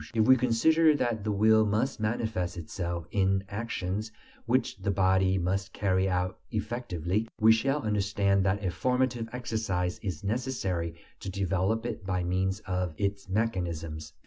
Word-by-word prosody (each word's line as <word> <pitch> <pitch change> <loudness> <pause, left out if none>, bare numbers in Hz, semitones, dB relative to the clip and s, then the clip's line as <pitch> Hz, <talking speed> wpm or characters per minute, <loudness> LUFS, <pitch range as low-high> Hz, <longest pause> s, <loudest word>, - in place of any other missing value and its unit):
If 110 -1 +4
we 130 - +8
consider 150 +6 +4
that 120 -6 -1
the 105 - -1
will 110 +2 +5
must 110 +5 0
manifest 110 -5 -1
itself 85 0 -4
in 95 -1 +2
actions 105 -1 -3 0.4
which 125 +3 +1
the 100 - -3
body 95 0 +3
must 95 +2 -1
carry 95 -1 +1
out 90 0 -1
effectively, 105 -3 -2
we 110 +1 +7
shall 135 +6 +2
understand 100 -2 +1
that 100 +1 0
a 90 - +1
formative 125 +5 0
exercise 110 -7 -2
is 95 -6 -5
necessary 100 -7 -2 0.2
to - - -5
develop 95 +4 0
it 115 -3 -4
by 95 -1 -1
means 95 +3 0
of 90 -5 -2
its 100 -1 -2
mechanisms. 85 -7 -2
100 Hz, 145 wpm, -29 LUFS, 90-115 Hz, 0.4 s, we